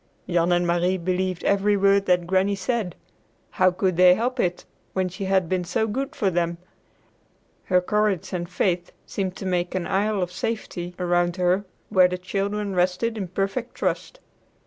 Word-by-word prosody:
Jan 175 -1 +2
and 175 0 +3
Marie 175 +2 +1
believed 185 0 -1
every 200 +1 +2
word 200 0 +3
that 180 -1 +3
Granny 190 +3 +2
said. 195 -2 -2 0.6
How 185 0 +4
could 185 -1 -1
they 180 0 +7
help 250 +4 -2
it 175 -4 -1 0.3
when 185 -1 0
she 185 +2 -5
had 190 -2 +2
been 185 +1 0
so 180 +5 0
good 265 +7 -3
to 200 -10 0
them! 170 -1 0 1.1
Her 180 -1 +3
courage 210 -2 0
and 175 -1 -3
faith 180 -1 0
seemed 190 -2 -3
to - - -7
make 180 -1 -1
an 180 -2 -1
isle 200 0 +1
of 180 - -4
safety 180 -3 -4
about 175 -1 +1
her 185 +2 +1 0.2
where 185 -1 +6
the 180 0 -3
children 200 +2 -2
rested 185 +6 +1
in 200 -4 -3
perfect 195 +7 -3
trust. - - -2
185 Hz, 170 wpm, -24 LUFS, 180-200 Hz, 1.1 s, they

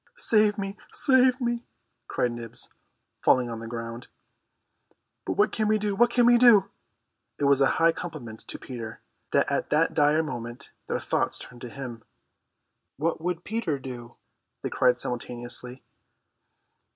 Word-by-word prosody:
"Save 215 - +3
me, 195 0 -4
save 260 -1 +4
me!" 240 -1 -1 0.4
cried 120 - 0
Nibs, 120 -1 -5 0.5
falling 125 -2 +3
on 115 - -5
the 115 - -7
ground. 115 +1 -6 1.2
"But - - 0
what 210 - +3
can 215 -2 0
we 215 0 +3
do, 210 -1 -1
what 240 +4 +5
can 240 0 +3
we 240 0 +6
do?" 230 -6 +6 0.7
It - - -4
was 140 -1 +4
a 135 - +6
high 165 0 +5
compliment 150 -11 -7
to - - -5
Peter 115 -3 -7 0.3
that - - +2
at - - -1
that 160 +2 +2
dire 150 +1 +3
moment 120 -5 -6 0.2
their - - -1
thoughts - - 0
turned 125 -1 -11
to 125 - -6
him. 120 -3 -7 0.9
"What 160 +3 -1
would 175 0 -2
Peter 215 -9 -1
do?" 125 -3 -8 0.5
they - - -3
cried 125 -1 +3
simultaneously. 125 +1 -5
145 Hz, 150 wpm, -27 LUFS, -, 1.2 s, we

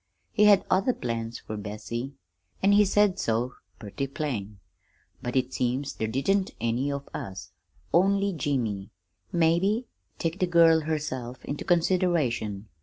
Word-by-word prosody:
He 210 -2 +4
had 205 -2 +6
other 195 +7 +2
plans 115 -1 -3
fer 110 - -7
Bessie, 110 +5 -5 0.5
an' 195 - +5
he 205 +1 +6
said 200 -1 +3
so 120 -4 0 0.2
purty 110 +6 -4
plain." 115 -8 -4 0.6
"But 120 - -4
it 130 0 +1
seems 130 +3 -1
there 110 - -2
didn't 185 - 0
any 120 +5 0
of 140 0 -5
us 95 -1 -6 0.4
only 195 +3 +3
Jimmy, 120 - -2 0.4
maybe 175 +8 +2 0.3
take 165 +2 -2
the 185 - +2
girl 165 -2 +6
herself 145 -6 -4
into 145 - -4
consideration. 160 - +1
140 Hz, 135 wpm, -27 LUFS, 115-180 Hz, 0.6 s, had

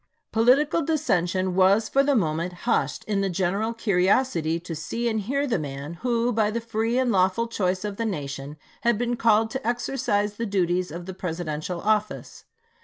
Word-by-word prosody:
Political 270 +8 +3
dissension 185 - 0
was 190 +4 +4
for 275 - +3
the 280 0 +2
moment 170 -3 0
bushed 240 - 0
in 205 -2 -1
the 195 - 0
general 195 +5 0
curiosity 190 -5 +1
to 170 0 -7
see 230 +10 -3
and 220 -2 0
hear 280 +7 -1
the 230 -9 0
man 140 +1 -6
who 240 -1 +1
by 215 -1 +2
the 230 +2 -2
free 230 +1 -1
and 255 -2 +2
lawful 190 +4 +2
choice 190 -3 -1
of 205 -1 -4
the 230 - -1
nation 145 -6 -5 0.2
had 235 -2 +2
been 240 +1 -1
called 225 -1 +3
to 265 -2 -4
exercise 235 -4 -1
the 230 - -2
duties 185 -2 0
of 170 +3 -7
the 190 - -6
Presi 175 -2 -4
dential 155 +4 -4
office. 215 0 -1
205 Hz, 180 wpm, -25 LUFS, 180-235 Hz, 0.2 s, was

